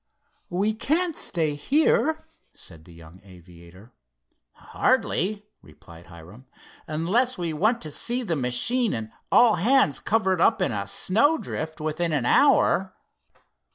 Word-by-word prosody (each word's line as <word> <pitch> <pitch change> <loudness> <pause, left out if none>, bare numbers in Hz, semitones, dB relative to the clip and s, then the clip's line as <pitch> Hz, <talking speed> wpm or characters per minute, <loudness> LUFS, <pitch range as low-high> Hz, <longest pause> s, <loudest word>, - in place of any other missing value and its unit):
"We 200 +5 -1
can't 320 +9 -1
stay 160 -4 -1
here," 295 - 0 0.3
said 80 -3 -11
the 90 - -16
young 85 +2 -16
aviator. 90 +3 -17 0.6
"Hardly," 205 +4 -1 0.2
replied 80 +3 -17
Hiram, 90 +9 -15 0.4
"unless 200 +12 0
we 170 -3 -3
want 215 +9 0
to 155 - -7
see 245 - -3
the 175 -7 -2
machine 150 - 0
and 110 -1 -6 0.2
all 240 -3 +5
hands 230 - +2
covered 190 -5 0
up 225 +4 +3
in 180 - 0
a 100 -3 -4
snowdrift 185 - 0
within 155 +2 -2
an 140 -5 -1
hour." - - +2
165 Hz, 125 wpm, -24 LUFS, -, 0.6 s, all